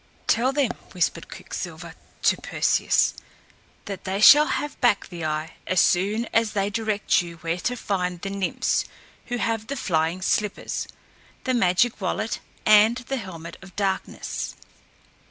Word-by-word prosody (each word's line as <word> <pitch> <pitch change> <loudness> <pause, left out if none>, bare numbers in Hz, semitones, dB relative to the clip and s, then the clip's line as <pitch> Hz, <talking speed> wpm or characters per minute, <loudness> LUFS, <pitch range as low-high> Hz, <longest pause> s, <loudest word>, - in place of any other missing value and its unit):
"Tell 245 +3 +2
them," 275 -4 +1 0.2
whispered 180 -2 -1
Quicksilver - - -7 0.3
to - - +4
Perseus, - - +2 0.7
"that 200 -2 -6
they 190 +1 -2
shall 295 +7 +9
have 295 -1 -3
back 240 -5 +3
the 175 -3 -7
eye 155 +1 -2
as 185 0 +2
soon 205 +8 +2
as 225 -1 +2
they 200 0 0
direct 215 -3 +1
you 170 -1 -8
where 165 +1 -3
to 245 +7 -1
find 180 -5 -2
the 195 +3 -5
Nymphs 195 -3 0 0.4
who 245 - -2
have 225 -2 -1
the 280 - -4
flying 165 -2 0
slippers, 210 +1 -1 0.6
the 260 - 0
magic 215 +1 +2
wallet 215 +4 -2 0.3
and 215 +2 +6
the 255 +2 -4
helmet 170 -6 -8
of 185 -2 -14
darkness." 195 -2 -3
200 Hz, 145 wpm, -24 LUFS, 180-230 Hz, 0.7 s, shall